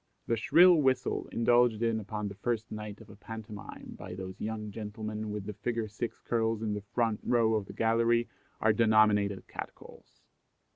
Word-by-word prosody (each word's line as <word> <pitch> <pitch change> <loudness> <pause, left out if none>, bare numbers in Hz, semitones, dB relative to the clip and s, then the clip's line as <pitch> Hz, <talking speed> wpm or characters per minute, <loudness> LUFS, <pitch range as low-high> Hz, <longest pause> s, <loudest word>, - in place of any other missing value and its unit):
The 115 - +1
shrill 170 +10 +6
whistle 130 -2 +1
indulged 120 -1 +3
in 115 -1 +1
upon 105 0 -4
the 100 - -6
first 110 +2 -3
night 105 -1 -7
of - - -13
a - - -12
pantomime 110 -1 -9
by - - -7
those 95 0 -7
young 105 -1 -4
gentlemen 110 0 -5
with 105 -1 -4
the 105 - -5
figure 115 +2 -2
six 110 +3 -5
curls 115 -1 0
in 105 -1 -1
the 105 - -3
front 110 +1 -1
row 115 -2 +2
of 105 -3 -1
the - - -9
gallery 115 +1 +2 0.3
are 110 -1 +4
denominated 105 -3 +3
cat - - -7
calls. - - -17
110 Hz, 180 wpm, -30 LUFS, 105-115 Hz, 0.3 s, shrill